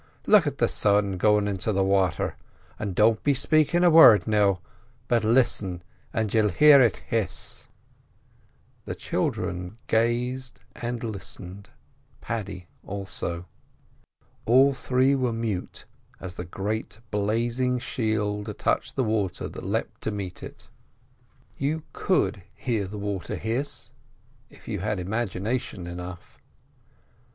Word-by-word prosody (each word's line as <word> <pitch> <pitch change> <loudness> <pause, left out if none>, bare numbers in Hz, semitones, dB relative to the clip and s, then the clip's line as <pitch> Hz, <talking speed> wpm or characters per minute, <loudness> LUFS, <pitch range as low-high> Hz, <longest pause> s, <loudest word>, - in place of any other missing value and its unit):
Look - - +5
at - - -2
the - - +3
sun 100 -2 +1
goin' 105 +2 +3
into 100 +2 -1
the 95 -1 +1
wather, 95 -3 +1 0.4
and 100 -4 -3
don't 110 +2 +4
be 145 -1 +3
spakin' 155 +5 +3
a 175 - +6
word, 115 - +8
now, 100 -3 +2 0.5
but 120 -3 +2
listen 110 -6 +1 0.3
and 110 -3 -1
you'll 110 -2 +3
hear 145 - +7
it 115 -6 +2
hiss." 110 -5 -2 1.2
The - - -4
children 90 +4 -3
gazed 120 +3 0 0.2
and 120 0 -4
listened, 100 -2 -6 0.5
Paddy 100 -5 -5 0.2
also. 95 -3 -5 1.0
All 135 +4 +6
three 130 +1 +2
were 130 -3 +1
mute 115 -5 -4 0.3
as 90 -2 -7
the 90 0 -6
great 105 +4 -4
blazing 115 +5 0
shield 105 -3 -2
touched - - -1
the 130 - +1
water 110 -5 -1
that - - -9
leapt - - -3
to - - -1
meet 100 -4 -5
it. - - -10 0.9
You 150 +3 -1
could 105 - +1
hear 110 -6 -2
the 105 +2 -7
water 100 -3 -3
hiss—if 120 +6 -7
you - - -3
had 105 +1 -2
imagination 105 0 -3
enough. 90 +1 -8
105 Hz, 125 wpm, -26 LUFS, 95-120 Hz, 1.2 s, word